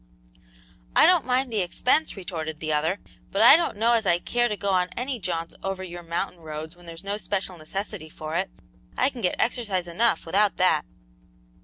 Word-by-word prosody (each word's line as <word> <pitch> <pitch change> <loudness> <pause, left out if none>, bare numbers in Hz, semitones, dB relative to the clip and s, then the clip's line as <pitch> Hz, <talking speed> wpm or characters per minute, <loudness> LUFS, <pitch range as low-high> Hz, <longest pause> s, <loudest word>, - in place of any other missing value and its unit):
"I - - +8
don't - - +4
mind 255 -1 +1
the 210 - +2
expense," 250 - +1
retorted 160 -4 -5
the 155 -1 -1
other, 160 +6 +1 0.3
"but 200 +3 +3
I 245 +5 +10
don't 330 -9 0
know 230 +3 +3
as 225 -4 +2
I 175 -1 +4
care 240 +6 +1
to 210 - -2
go 200 - -2
on 180 -1 +2
any 255 0 -2
jaunts 170 -3 -3
over 195 -1 -3
your 175 -1 -7
mountain 170 +2 -3
roads 160 +1 -7
when 175 -1 -16
there's 165 +2 -9
no 200 +1 -2
special 195 -3 -2
necessity 175 +1 -5
for 155 +1 -6
it; 190 +3 0 0.5
I 260 +2 +3
can 250 - -8
get 180 - +1
exercise 210 -7 0
enough 220 +7 +1
without 200 +4 +2
that." 170 -5 +3
190 Hz, 195 wpm, -25 LUFS, 170-220 Hz, 0.5 s, I